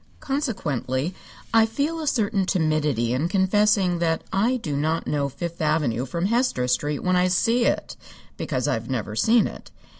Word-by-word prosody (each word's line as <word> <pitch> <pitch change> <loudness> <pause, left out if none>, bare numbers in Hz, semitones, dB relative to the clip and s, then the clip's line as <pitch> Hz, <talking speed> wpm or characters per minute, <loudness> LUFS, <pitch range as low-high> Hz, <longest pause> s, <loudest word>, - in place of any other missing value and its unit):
Consequently 175 - -2 0.4
I 225 -1 +5
feel 290 +8 -2
a 310 - -4
certain 205 -7 +1
timidity 150 - +1
in 140 +6 0
confessing 195 -1 +2
that 165 -1 0
I 225 +7 +2
do 150 - -4
not 160 +3 0
know 140 -2 -1
Fifth 170 +5 -6
Avenue 145 -6 0
from 170 +6 -2
Hester 230 - +1
Street 145 +4 -1
when 185 0 +2
I 180 0 +3
see 230 +6 +2
it, - - -1 0.4
because - - -2
I've - - -2
never - - -3
seen 230 0 +4
it. - - -8
180 Hz, 160 wpm, -24 LUFS, 150-220 Hz, 0.4 s, I